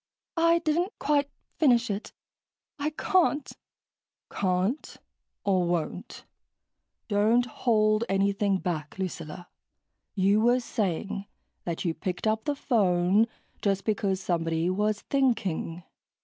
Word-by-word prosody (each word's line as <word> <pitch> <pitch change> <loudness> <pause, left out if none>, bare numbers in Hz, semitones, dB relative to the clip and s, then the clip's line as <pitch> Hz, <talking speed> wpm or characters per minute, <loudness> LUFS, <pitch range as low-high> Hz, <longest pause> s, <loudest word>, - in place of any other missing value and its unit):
"I 335 +1 +5
didn't 335 +4 0
quite 285 -1 +1 0.3
finish 245 -7 +4
it. 200 +2 -5 0.7
I 290 +1 0
can't." 305 -2 +1 0.8
"Can't? 190 +8 -1 0.5
Or 185 -3 +2
won't? 170 -2 -3 0.8
Don't 220 +3 +3
hold 215 -2 +2
anything 195 0 +2
back, 160 -4 -4
Lucilla. 175 -2 -5 0.7
You 200 +2 +3
were 240 +2 +4
saying 200 -3 -2 0.4
that 170 +1 -3
you 165 - +1
picked 180 +4 -4
up 220 0 +1
the 290 - 0
phone 200 -5 +3 0.3
just 195 -1 0
because 200 -3 0
somebody 165 -2 0
was 210 +2 0
thinking...." 195 - 0
205 Hz, 105 wpm, -27 LUFS, 185-245 Hz, 0.8 s, I